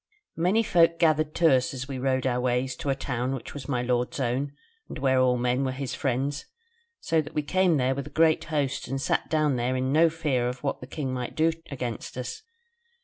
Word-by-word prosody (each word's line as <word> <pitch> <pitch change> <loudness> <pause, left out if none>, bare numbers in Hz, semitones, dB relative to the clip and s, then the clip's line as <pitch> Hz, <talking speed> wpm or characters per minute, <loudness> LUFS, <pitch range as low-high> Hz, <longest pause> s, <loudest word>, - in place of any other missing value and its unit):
"Many 185 +7 +2
folk 170 -5 +4
gathered 155 -2 +2
to 165 -4 +5
us 130 +1 +1
as 130 +1 -5
we 135 -2 -5
rode 130 0 0
our 125 -1 +1
ways 125 +1 0
to 140 - -4
a 135 - +2
town 130 -1 -2
which 130 - -8
was 140 -3 -7
my 125 -3 0
lord's 125 +2 -1
own, 130 +3 -1 0.4
and - - -6
where 130 -1 +2
all 125 -1 +3
men 125 +2 +1
were 130 - 0
his 130 -1 -4
friends, 140 +4 -2 0.5
so 160 -1 +1
that 145 - -10
we 150 - +1
came 180 +1 +2
there 130 0 +2
with 140 +1 -5
a - - -8
great 160 +1 +3
host 145 -4 -1
and 135 +1 -2
sat - - 0
down 155 -4 +2
there 125 +2 0
in 130 +1 0
no 165 +2 +5
fear 150 -7 0
of 125 0 -7
what - - -2
the 125 - -8
king 135 -2 -4
might 125 -1 -4
do 160 +1 +3 0.2
against 125 -4 -5
us. 125 - -5
135 Hz, 225 wpm, -27 LUFS, 125-155 Hz, 0.5 s, to